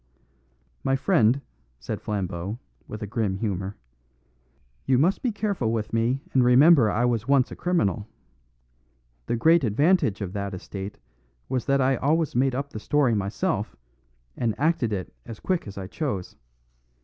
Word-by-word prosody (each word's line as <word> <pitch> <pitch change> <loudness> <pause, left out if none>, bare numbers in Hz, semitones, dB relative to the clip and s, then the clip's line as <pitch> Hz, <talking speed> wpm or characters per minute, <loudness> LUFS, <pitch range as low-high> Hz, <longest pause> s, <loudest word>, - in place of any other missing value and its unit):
"My 135 - +2
friend," 135 - +3 0.4
said - - -5
Flambeau, 95 0 -3 0.3
with 105 0 -7
a - - -2
grim 105 -2 -1
humour, 95 -1 -3 1.1
"you 130 - +2
must 170 +9 +2
be 245 - 0
careful 200 - -1
with 110 -2 -3
me 120 +4 +1
and 130 - +4
remember 130 0 +6
I 120 +4 +1
was 120 -1 0
once 135 -2 +3
a - - -6
criminal. 110 - 0 1.2
The - - 0
great 160 +6 +4
advantage 140 - +2
of 95 -3 -5
that 100 -1 -3
estate 95 +2 -7 0.5
was 130 -2 -2
that 140 0 +2
I 130 0 +2
always 155 +2 +1
made 130 +1 +2
up 140 +2 -3
the 110 - -6
story 140 +1 +2
myself, 100 -1 -1 0.6
and 115 -2 -2
acted 150 -7 +1
it 95 -8 -4
as 115 - -8
quick 185 - -1
as 100 - -9
I 95 - -5
chose. 100 - -4
120 Hz, 155 wpm, -25 LUFS, 105-140 Hz, 1.2 s, remember